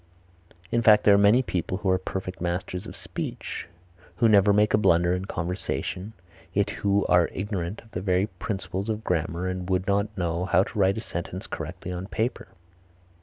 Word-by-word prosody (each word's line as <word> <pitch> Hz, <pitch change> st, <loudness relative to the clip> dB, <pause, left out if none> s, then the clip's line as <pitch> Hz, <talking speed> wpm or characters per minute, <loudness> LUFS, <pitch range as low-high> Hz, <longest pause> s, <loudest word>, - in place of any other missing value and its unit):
In 120 Hz, -, +2 dB
fact, 105 Hz, -2 st, +6 dB
there 105 Hz, -, +7 dB
are -, -, +6 dB
many 105 Hz, +6 st, +5 dB
people 95 Hz, -4 st, -2 dB
who 100 Hz, -1 st, -1 dB
are 95 Hz, -, +2 dB
perfect 95 Hz, -1 st, -5 dB
masters 90 Hz, +3 st, -3 dB
of -, -, -9 dB
speech, -, -, -5 dB, 0.5 s
who 115 Hz, -, +3 dB
never 100 Hz, -2 st, +6 dB
make 105 Hz, +1 st, +3 dB
a -, -, +6 dB
blunder 85 Hz, -3 st, +4 dB
in 90 Hz, +1 st, -2 dB
conversation, 90 Hz, +3 st, -3 dB, 0.4 s
yet 100 Hz, +1 st, +1 dB
who 100 Hz, -1 st, +1 dB
are 90 Hz, -1 st, +4 dB
ignorant 95 Hz, -1 st, -4 dB
of 110 Hz, -, -21 dB
the 90 Hz, -, -4 dB
very 95 Hz, 0 st, +2 dB
principles 95 Hz, 0 st, -4 dB
of 110 Hz, 0 st, -2 dB
grammar 85 Hz, 0 st, -1 dB
and 90 Hz, 0 st, -4 dB
would 95 Hz, 0 st, +1 dB
not 100 Hz, +1 st, 0 dB
know 85 Hz, 0 st, -1 dB
how 95 Hz, 0 st, +4 dB
to 105 Hz, -, -6 dB
write 95 Hz, +1 st, +3 dB
a -, -, -2 dB
sentence 90 Hz, -2 st, -5 dB
correctly 90 Hz, -, -6 dB
on 90 Hz, +1 st, -5 dB
paper. 110 Hz, +2 st, -2 dB
95 Hz, 185 wpm, -26 LUFS, 90-105 Hz, 0.5 s, there